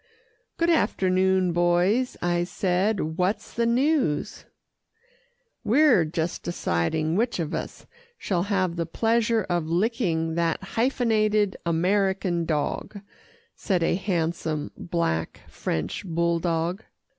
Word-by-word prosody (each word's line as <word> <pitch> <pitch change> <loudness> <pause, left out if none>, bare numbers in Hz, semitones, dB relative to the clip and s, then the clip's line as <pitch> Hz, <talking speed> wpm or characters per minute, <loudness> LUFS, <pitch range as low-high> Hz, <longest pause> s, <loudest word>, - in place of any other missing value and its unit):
"Good 340 0 +2
afternoon, 190 - +2
boys," 175 +8 +2
I 175 0 +1
said, 185 -2 -1
"what's 185 +4 -1
the 235 0 +1
news?" 255 - 0 1.2
"We're 255 - +4
just 160 +2 -3
deciding 155 - -1
which 235 0 0
of 160 -3 -3
us - - -5 0.3
shall 180 -4 -1
have 185 -4 0
the 170 -1 -2
pleasure 225 +3 +1
of 175 -3 -2
licking 170 -3 0
that 170 +1 0
hyphenated 215 -5 +1
American 185 0 +1
dog," 160 +6 -2 0.6
said 185 -5 0
a - - +2
handsome, 165 -5 -2
black 165 - -2
French 80 -1 -3
bulldog. 170 +1 -1
180 Hz, 105 wpm, -25 LUFS, 165-215 Hz, 1.2 s, We're